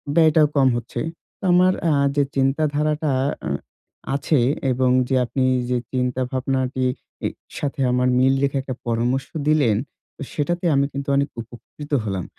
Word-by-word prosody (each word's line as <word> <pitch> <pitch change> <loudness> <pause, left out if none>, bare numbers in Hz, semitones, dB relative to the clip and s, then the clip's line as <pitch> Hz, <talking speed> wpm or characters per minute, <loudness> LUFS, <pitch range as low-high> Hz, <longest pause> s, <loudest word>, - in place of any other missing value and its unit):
ব্যয়টাও 160 -2 +5
কম 135 -1 +5
হচ্ছে। 120 +1 -5 0.4
তো - - -20
আমার 185 +1 +5 0.2
আ - - +3 0.2
যে 145 - +3
চিন্তাধারাটা 150 +2 +1 0.4
আ - - -2 0.7
আছে 145 +1 +1 0.3
এবং 130 0 +2 0.2
যে, 135 - +2
আপনি 130 +2 -1 0.3
যে 125 - +1 0.2
চিন্তা 125 0 0
ভাবনাটি 130 0 -1 0.4
ই - - +1 0.3
সাথে 140 -1 -3
আমার 125 0 +2
মিল 130 +1 +4
রেখে 140 0 +1
একটা 130 -1 -5
পরামর্শ 120 +3 0 0.2
দিলেন। 145 -9 +3 0.5
সেটাতে 175 +4 -2
আমি 140 0 +3
কিন্তু 140 0 -4
অনেক 140 +1 +1
উপকৃত 120 +6 -12
হলাম। 95 -4 -3
135 Hz, 145 wpm, -22 LUFS, 125-150 Hz, 0.7 s, ব্যয়টাও